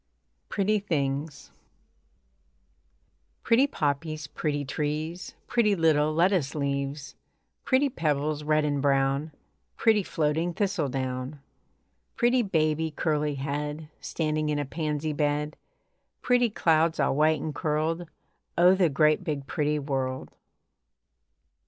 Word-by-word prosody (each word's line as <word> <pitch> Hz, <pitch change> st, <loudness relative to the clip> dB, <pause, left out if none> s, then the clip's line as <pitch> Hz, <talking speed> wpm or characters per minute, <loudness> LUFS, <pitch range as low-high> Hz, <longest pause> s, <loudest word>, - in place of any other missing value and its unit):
PRETTY 210 Hz, +2 st, +1 dB
THINGS 145 Hz, -5 st, -3 dB, 1.9 s
Pretty 255 Hz, +5 st, +4 dB
poppies, 155 Hz, -, -2 dB
Pretty 145 Hz, 0 st, -2 dB
trees, 155 Hz, +5 st, -3 dB
Pretty 215 Hz, -4 st, +2 dB
little 155 Hz, -3 st, +3 dB
lettuce 165 Hz, -2 st, +2 dB
leaves, 140 Hz, 0 st, -3 dB, 0.5 s
Pretty 265 Hz, +2 st, +3 dB
pebbles, 150 Hz, -, -1 dB
Red 155 Hz, 0 st, +2 dB
and 145 Hz, -1 st, 0 dB
brown, 140 Hz, +2 st, +1 dB, 0.5 s
Pretty 220 Hz, -2 st, +4 dB
floating 160 Hz, 0 st, -1 dB
thistle 195 Hz, -8 st, 0 dB
down. 130 Hz, +2 st, -4 dB, 0.8 s
Pretty 245 Hz, +1 st, +3 dB
baby, 160 Hz, -5 st, +1 dB
Curly 150 Hz, -1 st, -1 dB
head, 150 Hz, +2 st, -4 dB
Standing 155 Hz, -1 st, -1 dB
in 150 Hz, -, 0 dB
a 145 Hz, -, -1 dB
pansy 150 Hz, +1 st, -2 dB
bed, 150 Hz, +1 st, -1 dB, 0.7 s
Pretty 245 Hz, -1 st, +3 dB
clouds 165 Hz, -4 st, +2 dB
All -, -, +2 dB
white 155 Hz, +1 st, +3 dB
and 155 Hz, +1 st, -4 dB
curled 160 Hz, +3 st, -1 dB, 0.5 s
O 180 Hz, +2 st, +7 dB
the 185 Hz, -3 st, +3 dB
great, 155 Hz, +4 st, +3 dB
big 150 Hz, -5 st, -3 dB
pretty 150 Hz, +1 st, 0 dB
world! 135 Hz, -2 st, -3 dB
155 Hz, 110 wpm, -27 LUFS, 145-165 Hz, 1.9 s, O